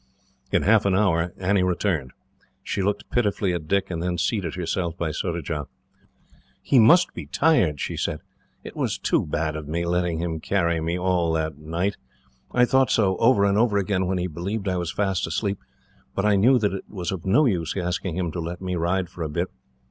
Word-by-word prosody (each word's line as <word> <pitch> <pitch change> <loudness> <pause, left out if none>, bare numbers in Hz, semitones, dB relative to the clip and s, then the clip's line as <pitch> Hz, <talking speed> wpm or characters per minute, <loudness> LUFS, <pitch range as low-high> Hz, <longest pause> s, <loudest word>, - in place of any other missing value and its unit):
In - - +2
half 105 +1 +4
an 95 - +2
hour 90 -4 +2
Annie 95 +1 +1
returned. 90 -6 0 0.5
She 100 - -2
looked 100 +2 -1
pitifully 100 -5 +1
at 80 -3 -4
Dick, 100 +1 0
and 85 -1 -3
then 90 0 -1
seated 90 -1 -1
herself 85 -1 -2
by 80 -2 -1
Surajah. 80 -3 -3 0.9
"He 130 - +3
must 170 +11 +6
be - - -7
tired," 100 - +2
she - - -3
said. - - -2 0.4
"It - - -9
was - - -1
too - - 0
bad 75 +1 -1
of 75 -1 -6
me, 85 +3 -2
letting 90 -1 0
him 80 -1 -3
carry 85 -2 0
me 85 +2 -1
like 90 -3 +1
that 80 0 -1
all 75 +2 -14
night. 90 +5 -1 0.5
I 125 0 +4
thought 130 +1 +3
so, 95 -4 +2
over 115 -4 +4
and 100 +1 +2
over 110 -3 +3
again, 95 -2 0
when 95 0 0
he 90 - -1
believed 95 +5 -4
I 90 -1 0
was 85 -2 -2
fast 95 -4 -1
asleep, 100 +3 -2 0.6
but 95 - 0
I 105 -1 +4
knew 120 +7 +5
that 105 -4 0
it 95 - -5
was 90 -4 -4
of 95 -4 -5
no 115 +11 +4
use 90 - 0
asking 90 -1 -2
him 90 -3 -1
to 85 - -5
let 85 +1 -5
me 90 -1 -3
ride 90 +2 0
for 90 0 -11
a 80 - -2
bit. 75 - -2
90 Hz, 210 wpm, -24 LUFS, 85-100 Hz, 0.9 s, must